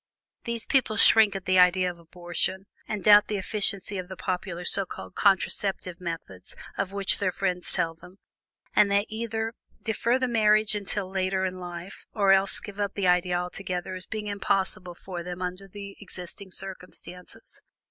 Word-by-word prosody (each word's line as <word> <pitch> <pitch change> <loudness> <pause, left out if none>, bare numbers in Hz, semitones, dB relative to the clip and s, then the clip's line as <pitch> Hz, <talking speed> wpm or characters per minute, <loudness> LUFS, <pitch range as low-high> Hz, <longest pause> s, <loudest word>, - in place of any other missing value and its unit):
These 235 -1 -3
people 250 -5 +2
shrink 215 -1 +6
at 195 - -5
the 185 0 +4
idea 180 0 +5
of 175 - -15
abortion, 175 +3 -3 0.2
and 210 -3 -3
doubt 210 -1 +7
the 210 - -1
efficacy 200 0 0
of 180 - -6
the 190 - -7
popular 180 -1 -3
so 200 - +3
called 95 - -9
contraceptive 190 -2 +1
methods 165 - -6 0.2
of 195 -1 -2
which 200 -1 0
their 185 -2 +1
friends 180 -1 0
tell 165 -1 +1
them, 180 +3 -16 0.6
and 205 - +6
they 200 +1 +3
either 225 0 -3 0.3
defer 235 +2 +1
the 260 -1 0
marriage 215 -2 +4
until 205 -1 -2
later 190 0 0
in 185 0 -4
life, 175 +1 -8
or 200 -3 +4
else 195 0 +4
give 205 0 -10
up 205 -1 -1
the 200 - -1
idea 180 0 +3
altogether 180 0 -4
as 185 0 -7
being 215 -1 -4
impossible 195 -3 -1
for 180 -1 -7
them 180 +1 -6
under 185 +2 -4
the 200 0 -9
existing 190 0 -8
circumstances. 180 -1 -7
190 Hz, 170 wpm, -27 LUFS, 180-205 Hz, 0.6 s, doubt